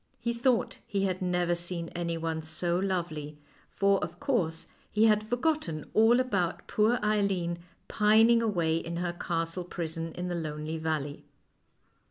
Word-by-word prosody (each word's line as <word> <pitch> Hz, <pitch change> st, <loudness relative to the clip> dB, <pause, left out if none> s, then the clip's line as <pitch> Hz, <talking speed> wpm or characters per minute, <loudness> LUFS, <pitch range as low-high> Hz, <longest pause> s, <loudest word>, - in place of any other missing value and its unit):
He 235 Hz, -, -1 dB
thought 235 Hz, 0 st, +1 dB
he 200 Hz, -1 st, -1 dB
had 185 Hz, -1 st, -1 dB
never 180 Hz, -1 st, +1 dB
seen 170 Hz, -1 st, -3 dB
anyone 165 Hz, -2 st, -2 dB
so 170 Hz, +3 st, -1 dB
lovely, 165 Hz, -6 st, -2 dB, 0.3 s
for, 200 Hz, 0 st, +2 dB
of -, -, -6 dB
course, 175 Hz, -, 0 dB, 0.3 s
he 215 Hz, +1 st, +4 dB
had 215 Hz, 0 st, +3 dB
forgotten 245 Hz, -, -1 dB
all 225 Hz, +3 st, +5 dB
about 195 Hz, -9 st, 0 dB
poor 220 Hz, +3 st, +2 dB
Eileen 195 Hz, -5 st, +1 dB, 0.3 s
pining 225 Hz, +2 st, +5 dB
away 170 Hz, -8 st, +1 dB
in 170 Hz, +1 st, -4 dB
her 175 Hz, 0 st, -2 dB
castle 165 Hz, +1 st, -2 dB
prison 165 Hz, -2 st, -4 dB
in 180 Hz, 0 st, -4 dB
the 180 Hz, -, -2 dB
lonely 155 Hz, -1 st, -4 dB
valley. 155 Hz, -3 st, -2 dB
175 Hz, 145 wpm, -29 LUFS, 165-210 Hz, 0.3 s, all